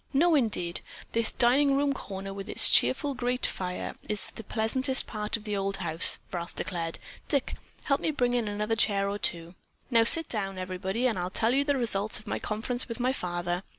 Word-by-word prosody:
"No 330 +5 +4
indeed. 210 - 0 0.3
This 230 0 +1
dining 275 +3 +3
room 280 0 +1
corner 195 -5 -7
with 195 0 -8
its - - +5
cheerful 290 -3 +3
grate 250 0 -1
fire 180 -1 -4 0.2
is 210 -2 -3
the 225 - -10
pleasantest 260 +6 +1
part 210 0 -3
of 220 - -14
the 210 -2 -3
old 195 0 -2
house," 170 -2 0 0.2
Ralph 170 -1 -5
declared. 165 -2 -3 0.3
"Dick, 280 -3 -1 0.3
help 275 -1 0
me - - 0
bring 250 -5 0
in 240 -3 0
another 210 +2 -1
chair 200 -3 +2
or 200 +1 -3
two." 170 -2 -2 0.4
"Now 230 -1 +5
sit 325 +8 +9
down, 195 -4 -3
everybody, 185 +5 -3
and 230 -7 +1
I'll 180 +1 -2
tell 225 +5 +1
you 275 +2 +2
the 285 -1 0
results 215 -4 +2
of 215 - -12
my - - -3
conference 235 +4 -1
with 230 0 -6
my 255 +2 +1
father." 175 -4 -3
215 Hz, 200 wpm, -28 LUFS, 195-250 Hz, 0.4 s, sit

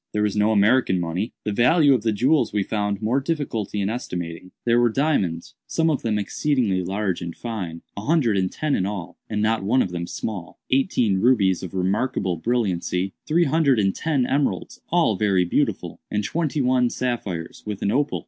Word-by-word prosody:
There 105 - +1
was 105 -1 0
no 105 +1 +3
American 105 -2 +3
money. 90 +6 -2
The 105 - -2
value 140 +7 +4
of 125 - +1
the 110 0 +1
jewels 130 +8 +2
we 105 -1 0
found 105 0 -2
more 120 +5 +2
difficulty 135 - -2
in 95 - 0
estimating. 90 -7 -5 0.2
There 120 0 +4
were 120 0 +4
diamonds—some 140 - -1
of 145 - -1
them 110 -2 0
exceedingly 105 -2 0
large 95 0 -2
and 85 -1 -5
fine—a 100 -5 -6
hundred 140 -5 +2
and 95 -1 0
ten 155 -2 -2
in 95 - +1
all, 90 -3 -6
and 105 -1 -1
not 110 +1 +1
one 125 +6 +3
of 90 - -5
them 85 -1 -4
small; 90 -7 -5
eighteen 125 - +2
rubies 100 -6 +3
of 95 0 -7
remarkable 95 0 0
brilliancy;—three 105 - 0
hundred 145 -3 +3
and 95 -3 +2
ten 145 -6 0
emeralds, 140 +2 -1
all 165 - +2
very 95 -3 +2
beautiful; 85 - -1
and 105 0 -1
twenty 155 +5 -1
one 125 -1 +3
sapphires, 105 -11 -3
with 105 -2 -4
an 100 - +1
opal. 145 +4 0
105 Hz, 180 wpm, -23 LUFS, 95-130 Hz, 0.2 s, value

